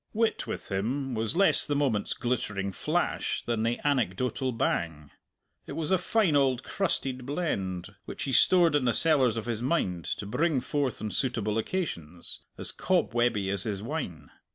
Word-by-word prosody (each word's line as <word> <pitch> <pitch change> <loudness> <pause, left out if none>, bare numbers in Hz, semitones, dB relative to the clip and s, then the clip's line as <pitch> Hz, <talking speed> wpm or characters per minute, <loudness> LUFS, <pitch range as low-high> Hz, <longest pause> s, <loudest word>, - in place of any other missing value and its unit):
Wit 225 +1 0
with - - -6
him 125 +8 -1
was 110 +5 -1
less 195 +2 +5
the 145 - 0
moment's 130 -8 0
glittering 105 -5 -2
flash - - -1
than 115 -2 -1
the 115 +2 0
anecdotal 125 0 0
bang; 80 - -2 0.6
it - - -6
was 160 0 -2
a 190 - +4
fine 210 -9 +2
old 135 -2 +2
crusted 135 -9 -1
blend 100 - -3
which - - -6
he 135 - -2
stored 170 +1 +5
in 145 -3 +2
the 120 - +3
cellars 135 -8 +4
of 110 - -3
his 115 -2 -2
mind 110 - 0
to - - -3
bring 150 +7 +1
forth 135 -2 -2
on 105 - -2
suitable 115 -4 0
occasions, 90 - -4 0.2
as - - -1
cob - - 0
webby 120 -5 +1
as 100 -2 0
his 100 -1 -3
wine. 90 - -5
120 Hz, 170 wpm, -28 LUFS, 100-145 Hz, 0.6 s, less